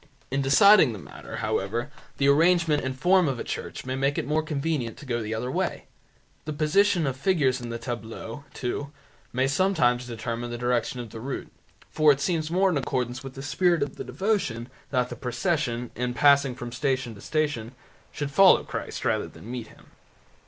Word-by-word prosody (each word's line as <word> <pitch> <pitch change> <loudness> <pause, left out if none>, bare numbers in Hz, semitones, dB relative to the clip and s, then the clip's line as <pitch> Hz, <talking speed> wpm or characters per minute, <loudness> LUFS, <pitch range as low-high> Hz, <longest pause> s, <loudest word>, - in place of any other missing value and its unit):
In 135 +1 +1
deciding 150 - +6
the - - -6
matter, 90 - -10
however, 115 +8 -1 0.3
the 140 - +2
arrangement 160 +1 +4
and 130 0 -3
form 180 0 +4
of 135 -3 -1
a - - -3
church - - -5
may 130 - -3
make 135 +1 0
it - - -1
more 155 +2 +1
convenient 150 -6 -2
to - - -11
go 120 -3 -1
the 110 +1 -3
other 125 +3 -3
way. - - -2 0.6
The 155 - -3
position 170 +4 +3
of 135 -2 -1
the 130 - -19
figures 140 -9 +2
in 120 - -6
the 115 - -3
tableaux, 115 +2 -6
too, 140 +3 -4 0.4
may 130 +1 +1
sometimes 135 -6 +2
determine 120 0 -4
the 120 - -4
direction 125 +1 0
of 115 -3 -9
the 115 - -8
route, 130 +4 -5 0.4
for 155 -1 +5
it 140 - +1
seems 160 0 -1
more 185 +2 +3
in 160 - 0
accordance 125 -1 -2
with 135 -1 -8
the 135 - -7
spirit 170 +3 +2
of 140 - -6
the - - -4
devotion 145 - -1 0.2
that 125 -2 0
the - - -6
procession, 125 -3 -1
in 125 0 -2
passing 140 -2 +4
from 120 -1 -7
station 130 -1 -1
to 100 - -13
station, 145 -6 -2 0.4
should 145 -1 -4
follow 190 +6 +6
Christ - - -5
rather - - +1
than 115 - -11
meet 120 -3 -5
Him. - - -19
135 Hz, 195 wpm, -26 LUFS, 120-155 Hz, 0.6 s, deciding